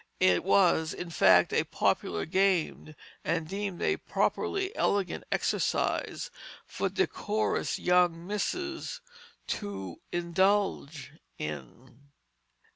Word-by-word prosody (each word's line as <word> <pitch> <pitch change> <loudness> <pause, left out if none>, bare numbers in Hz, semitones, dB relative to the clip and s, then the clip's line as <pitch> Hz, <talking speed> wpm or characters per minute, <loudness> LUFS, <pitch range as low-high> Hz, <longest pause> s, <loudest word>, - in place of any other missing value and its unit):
It 185 0 +4
was, 175 -4 +3
in 175 -1 -6
fact, 155 - +5
a - - +3
popular 80 -1 0
game, 185 -5 +1 0.3
and 160 - -1
deemed 195 0 -4
a 395 - +2
properly 390 +2 -1
elegant 200 -2 0
exercise - - 0 0.3
for - - -2
decorous 215 +1 -1
young 175 -2 +2
misses 345 - -3 0.5
to 95 - -5
indulge 175 -4 0 0.3
in. 75 - -8
180 Hz, 95 wpm, -29 LUFS, 160-205 Hz, 0.5 s, fact